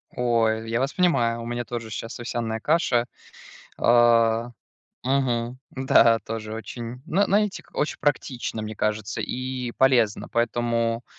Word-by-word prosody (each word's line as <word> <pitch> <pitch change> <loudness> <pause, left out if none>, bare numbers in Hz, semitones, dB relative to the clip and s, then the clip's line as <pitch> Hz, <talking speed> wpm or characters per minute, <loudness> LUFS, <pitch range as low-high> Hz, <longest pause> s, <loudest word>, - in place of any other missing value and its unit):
Ой, 115 -2 +1
я 115 +1 0
вас 135 +2 -1
понимаю, 120 -10 +2
у - - -6
меня 120 +1 -3
тоже 115 -2 -5
щас 115 +2 -6
овсяная 115 -2 -3
каша, 125 -4 +2 0.7
а. 115 -1 +4 0.5
Мгм. 125 -2 0
Да, 120 -3 +4
тоже 110 -1 -6
очень. 115 +2 -7
Но, 195 +5 +2
знаете, 205 0 +1
очень 150 - -1
практично, 130 -5 -1
мне 110 0 -5
кажется, 105 +1 -2
и 130 -1 -4
полезно. 120 -5 +3
Поэтому 115 0 0
120 Hz, 130 wpm, -24 LUFS, 115-130 Hz, 0.7 s, а